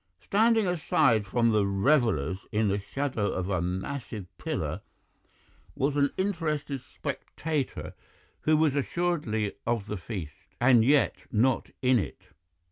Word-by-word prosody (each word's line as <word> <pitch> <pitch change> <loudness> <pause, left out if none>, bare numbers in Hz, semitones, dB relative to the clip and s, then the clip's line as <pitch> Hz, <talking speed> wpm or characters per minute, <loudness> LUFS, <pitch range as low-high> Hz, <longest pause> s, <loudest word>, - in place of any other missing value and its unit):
"Standing 220 - +3
aside 155 - +2
from 115 +3 +2
the 105 -2 +3
revellers 100 - +1
in 105 -1 +2
the 100 +1 0
shadow 115 0 -2
of 95 +1 -2
a 90 -3 +1
massive 95 +4 -4
pillar - - -3 0.9
was 140 +2 0
an 140 -1 +3
interested 155 -8 -1
spectator 150 +2 -4 0.5
who 155 0 +3
was 155 -3 +3
assuredly 140 - -1
of 115 -4 0
the 105 - -4
feast, 90 -6 -8
and 120 -2 +6
yet 140 +3 +2
not 125 +4 +2
in 125 -1 +5
it. - - -6
125 Hz, 125 wpm, -28 LUFS, 105-150 Hz, 0.9 s, and